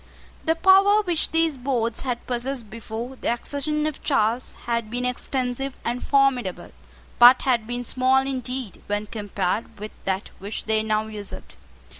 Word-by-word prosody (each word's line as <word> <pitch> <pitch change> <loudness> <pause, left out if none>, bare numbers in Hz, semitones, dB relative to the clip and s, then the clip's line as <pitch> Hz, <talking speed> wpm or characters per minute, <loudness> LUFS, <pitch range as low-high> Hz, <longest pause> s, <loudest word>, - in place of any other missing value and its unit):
The 325 0 +2
power 390 +4 +6
which 345 -5 0
these 325 -3 +1
boards 240 -3 -1
had 245 -3 -3
possessed 245 -2 -3
before 230 +3 -6
the - - -1
accession 290 +5 -1
of 310 -2 -4
Charles 240 -3 +1
had 235 -2 -1
been 245 +2 -2
extensive 255 +1 -2
and 240 +1 -2
formidable, 270 -9 +1 0.5
but 245 +1 +9
had 240 -4 +1
been 245 0 -4
small 260 +2 +2
indeed 255 -4 -4
when 205 +1 -1
compared 205 -1 -3
with 215 +1 -6
that 190 0 -1
which 200 +3 -4
they 220 0 +1
now 215 0 0
usurped. 210 -2 -8
245 Hz, 150 wpm, -24 LUFS, 220-275 Hz, 0.5 s, but